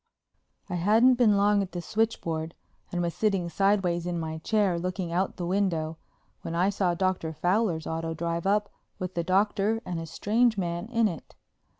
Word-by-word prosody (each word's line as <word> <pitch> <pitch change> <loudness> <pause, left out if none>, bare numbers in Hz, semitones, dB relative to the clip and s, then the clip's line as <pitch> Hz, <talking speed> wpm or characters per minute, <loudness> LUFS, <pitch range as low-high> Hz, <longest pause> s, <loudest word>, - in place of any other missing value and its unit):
I 185 - -6
hadn't 220 +8 +5
been 235 -5 +4
long 205 0 +3
at 190 -1 -5
the 175 - -3
switchboard, 170 -5 -2 0.4
and 175 0 -1
was 170 -1 -1
sitting 195 -5 0
sideways 185 -3 +1
in 175 -1 -2
my 160 -1 -4
chair 200 -1 +1
looking 180 0 -3
out 185 +3 +1
of - - -21
the 175 - -4
window 170 -4 -1 0.4
when 165 - -5
I 185 +4 +2
saw 185 -3 0
Dr. 180 -3 -1
Fowler's 175 0 0
auto 165 0 -3
drive 170 +2 -2
up 205 +1 +1 0.3
with 185 0 -4
the 170 - -1
Doctor 200 +4 +1
and 175 -2 -3
a 165 - -6
strange 220 +7 +1
man 175 +1 -2
in 230 -2 +3
it. 170 -7 -7
185 Hz, 185 wpm, -27 LUFS, 170-205 Hz, 0.4 s, hadn't